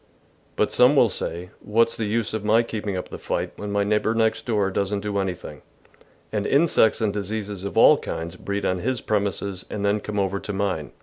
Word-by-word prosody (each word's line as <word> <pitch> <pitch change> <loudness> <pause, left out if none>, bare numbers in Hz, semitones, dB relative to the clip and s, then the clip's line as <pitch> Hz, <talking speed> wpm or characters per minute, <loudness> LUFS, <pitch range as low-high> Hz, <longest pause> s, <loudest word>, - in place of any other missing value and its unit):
But - - +1
some 125 +4 +5
will 120 -5 +5
say, 90 -1 -4
" - - -32
What's 115 +2 +2
the 110 - -2
use 110 +1 -1
of 110 -1 -3
my 110 +2 +4
keep 110 -2 -5
ing 95 -2 -1
up 90 - -5
the - - -8
fight - - -2
when 105 0 -5
my 100 0 +1
neighbour 105 +2 +1
next 110 +1 +1
door 105 -4 +1
doesn't 100 +1 -1
do 100 -1 -2
anything, 95 -2 -4 0.7
and 105 -1 -1
insects 140 -7 +3
and 105 -2 +1
diseases 105 -1 -4
of 100 -3 -5
all - - +7
kinds 80 +2 -5
breed 100 +2 -3
on 90 0 0
his 125 +4 -1
premises 100 -3 -2
and 105 -1 -3
then 100 +1 +2
come 105 0 -4
over 100 0 0
to 105 - -5
mine? 95 -6 -2
105 Hz, 220 wpm, -24 LUFS, 100-110 Hz, 0.7 s, all